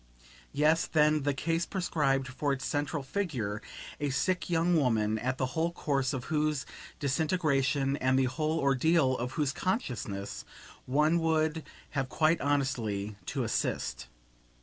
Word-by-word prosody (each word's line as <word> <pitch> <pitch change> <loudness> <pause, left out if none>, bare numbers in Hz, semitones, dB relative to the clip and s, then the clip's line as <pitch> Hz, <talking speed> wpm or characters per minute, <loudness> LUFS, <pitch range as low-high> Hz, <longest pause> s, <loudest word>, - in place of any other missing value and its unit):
Yes 155 +3 +3
then, 155 -1 +3
the 145 0 +1
case 165 +4 -1
prescribed 140 -8 0
for 140 +3 -1
its 135 - -4
central 145 -1 -1
figure 130 - -2 0.4
a 145 - 0
sick 180 +8 0
young 170 +1 +2
woman, 110 -7 +2
at 130 +2 -1
the 130 - 0
whole 165 +1 +1
course 140 -6 0
of 130 -3 -3
whose 150 -2 0 0.3
disintegration 140 -2 +1
and 130 -1 +2
the 135 - +4
whole 155 +5 -1
ordeal 140 0 +3
of 125 +2 -3
whose 145 -3 0
consciousness 120 - -3 0.4
one 150 +6 +3
would 160 -1 +1 0.3
have 135 -3 -2
quite 160 +3 +2
honestly 115 -8 -1
to - - -1
assist. - - -2
145 Hz, 140 wpm, -30 LUFS, 130-160 Hz, 0.4 s, the